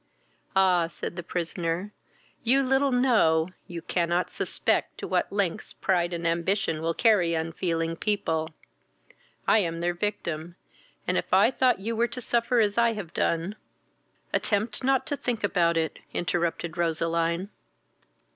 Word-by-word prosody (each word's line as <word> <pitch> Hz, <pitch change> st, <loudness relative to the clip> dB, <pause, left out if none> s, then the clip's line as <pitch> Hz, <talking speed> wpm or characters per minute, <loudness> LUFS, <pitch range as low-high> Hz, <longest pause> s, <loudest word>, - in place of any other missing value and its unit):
"Ah! 180 Hz, -3 st, +4 dB
(said 170 Hz, -, -6 dB
the 175 Hz, -, -4 dB
prisoner) 175 Hz, +3 st, -3 dB, 0.5 s
you 265 Hz, +4 st, +3 dB
little 270 Hz, +1 st, +2 dB
know, 215 Hz, -11 st, +3 dB, 0.2 s
you 170 Hz, -1 st, -7 dB
cannot 175 Hz, 0 st, 0 dB
suspect -, -, 0 dB
to -, -, -5 dB
what -, -, 0 dB
lengths 200 Hz, 0 st, -1 dB
pride 175 Hz, -2 st, 0 dB
and 170 Hz, -1 st, -4 dB
ambition 170 Hz, 0 st, 0 dB
will 165 Hz, 0 st, -1 dB
carry 190 Hz, -8 st, +3 dB
unfeeling 165 Hz, 0 st, -1 dB
people. 165 Hz, -5 st, -1 dB, 1.0 s
I -, -, +6 dB
am 165 Hz, -4 st, -1 dB
their 175 Hz, +1 st, 0 dB
victim, 175 Hz, -4 st, -3 dB, 0.5 s
and -, -, +1 dB
if -, -, -7 dB
I -, -, +5 dB
thought 255 Hz, -7 st, +2 dB
you 225 Hz, +3 st, -2 dB
were 235 Hz, +2 st, +2 dB
to 235 Hz, +2 st, -6 dB
suffer 235 Hz, 0 st, +1 dB
as 210 Hz, 0 st, +2 dB
I 235 Hz, -1 st, +4 dB
have 195 Hz, -7 st, -7 dB
done 170 Hz, +5 st, 0 dB, 0.4 s
" -, -, -40 dB
"Attempt 215 Hz, +3 st, 0 dB
not 265 Hz, 0 st, +2 dB
to 290 Hz, -, -1 dB
think 240 Hz, -5 st, -3 dB
about 170 Hz, -4 st, +2 dB
it," 160 Hz, -1 st, -1 dB, 0.2 s
interrupted 170 Hz, -1 st, -1 dB
Roseline. 170 Hz, +2 st, 0 dB
175 Hz, 145 wpm, -27 LUFS, 165-220 Hz, 1.0 s, I